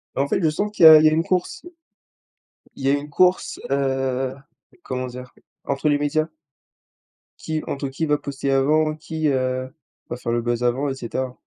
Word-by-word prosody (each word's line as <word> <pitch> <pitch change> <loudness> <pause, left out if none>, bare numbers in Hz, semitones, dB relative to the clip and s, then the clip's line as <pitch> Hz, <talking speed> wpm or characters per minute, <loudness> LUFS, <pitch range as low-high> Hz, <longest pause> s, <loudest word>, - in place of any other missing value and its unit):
Bah, - - +1
en - - -3
fait, - - 0
je 160 - +3
sens 205 +7 -2
qu'il 210 - +4
y - - +13
a 155 - +10
il 155 - +3
y - - +8
a - - -4
une 160 +1 +1
course. 180 0 -2 1.1
Il 135 - -9
y - - +3
a - - +4
une 145 +1 -3
course, 180 +5 +2
heu, 135 -1 -1 0.5
comment 130 -1 -4
dire, 125 0 -10 0.3
entre 140 +2 0
les 145 - +3
médias 155 +2 0 1.1
qui 155 -1 -3
entre 140 0 -3
qui 135 +5 -3
va 150 -1 +2
poster 140 -1 -4
avant 155 +3 +2
qui, 160 0 -3
heu, 130 -1 -1 0.4
va 120 - -4
faire 120 - -4
le 120 0 0
buzz 120 0 -2
avant 130 +4 0
et 135 - -3
cetera. 130 0 -5
140 Hz, 205 wpm, -22 LUFS, 130-155 Hz, 1.1 s, y